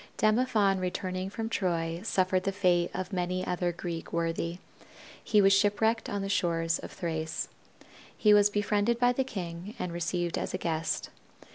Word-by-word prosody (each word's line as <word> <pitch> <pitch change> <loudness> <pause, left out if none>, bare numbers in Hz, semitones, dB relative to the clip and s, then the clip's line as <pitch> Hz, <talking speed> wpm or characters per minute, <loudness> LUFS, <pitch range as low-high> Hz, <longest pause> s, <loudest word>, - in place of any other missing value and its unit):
Demophon 215 -3 +3
returning 185 +1 -3
from 225 +2 -4
Troy 170 -6 -1
suffered 185 -4 +1
the 195 - -1
fate 180 -3 +2
of 185 +2 -5
many 180 0 -1
another 180 -1 -1
Greek 170 -1 -6
worthy. 170 0 -1 0.7
He 210 -2 +4
was 195 0 +6
ship 205 +1 +3
wrecked 225 +1 +1
on 200 -1 -2
the - - -2
shores 165 -4 +1
of - - -8
Thrace. 160 -2 -3 0.7
He 210 -1 +5
was 205 0 +6
befriended 205 +2 +1
by 245 +1 +3
the 265 - +1
king 185 -3 -6
and 180 -2 -4
received 175 0 -1
as - - -3
a - - 0
guest. 160 -1 -2
185 Hz, 165 wpm, -29 LUFS, 170-205 Hz, 0.7 s, was